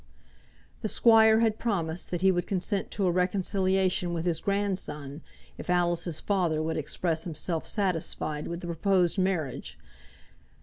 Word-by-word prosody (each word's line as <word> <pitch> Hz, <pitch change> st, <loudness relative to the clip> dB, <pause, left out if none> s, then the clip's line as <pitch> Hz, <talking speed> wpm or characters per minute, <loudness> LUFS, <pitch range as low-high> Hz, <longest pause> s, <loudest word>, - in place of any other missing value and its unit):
The -, -, -1 dB
squire 220 Hz, 0 st, +5 dB
had 220 Hz, -2 st, +1 dB
promised 175 Hz, -7 st, -2 dB
that 175 Hz, -1 st, -3 dB
he 190 Hz, 0 st, +5 dB
would 175 Hz, -1 st, -1 dB
consent 195 Hz, +1 st, -2 dB
to 200 Hz, -, -1 dB
a 180 Hz, -, +3 dB
reconciliation 185 Hz, -1 st, +1 dB
with 165 Hz, 0 st, -3 dB
his 170 Hz, -2 st, +1 dB
grandson, 175 Hz, -8 st, -2 dB, 0.4 s
if -, -, -8 dB
Alice's 175 Hz, -2 st, +1 dB
father 180 Hz, -6 st, 0 dB
would 160 Hz, +1 st, -1 dB
express 160 Hz, +2 st, -1 dB
himself 165 Hz, 0 st, -3 dB
satisfied 165 Hz, -6 st, -1 dB
with 170 Hz, +1 st, -5 dB
the -, -, -7 dB
proposed 180 Hz, +2 st, +1 dB
marriage. 175 Hz, -9 st, -2 dB
180 Hz, 140 wpm, -28 LUFS, 165-195 Hz, 0.4 s, squire